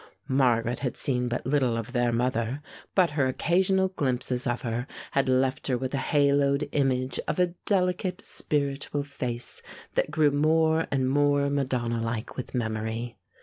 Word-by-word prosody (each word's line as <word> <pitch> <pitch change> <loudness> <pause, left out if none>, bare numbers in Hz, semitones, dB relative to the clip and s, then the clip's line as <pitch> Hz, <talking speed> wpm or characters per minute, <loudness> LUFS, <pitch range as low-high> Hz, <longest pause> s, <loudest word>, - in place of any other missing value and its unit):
Margaret 125 -3 +2
had 130 -3 -3
seen 125 -2 0
but 120 0 -3
little 130 -4 +1
of 115 +1 -5
their 120 -2 +1
mother, 120 +3 -1 0.3
but 180 -4 +4
her 145 -3 +1
occasional 190 +7 +2
glimpses 130 -6 -1
of 120 0 -1
her 120 +1 -2 0.2
had 135 -1 +1
left 130 +1 +1
her 130 -3 +1
with 130 +1 -4
a - - +1
haloed 140 0 +2
image 130 -2 0
of - - -1
a 180 -1 +2
delicate, 180 -1 0
spiritual 140 0 -2
face 125 -4 -5 0.3
that - - +1
grew 150 -1 +3
more 160 +2 +2
and 130 -2 +1
more 145 +1 +2
Madonna 125 -4 -1
like 115 0 -3
with 130 - -6
memory. 110 0 -2
135 Hz, 155 wpm, -27 LUFS, 120-145 Hz, 0.3 s, but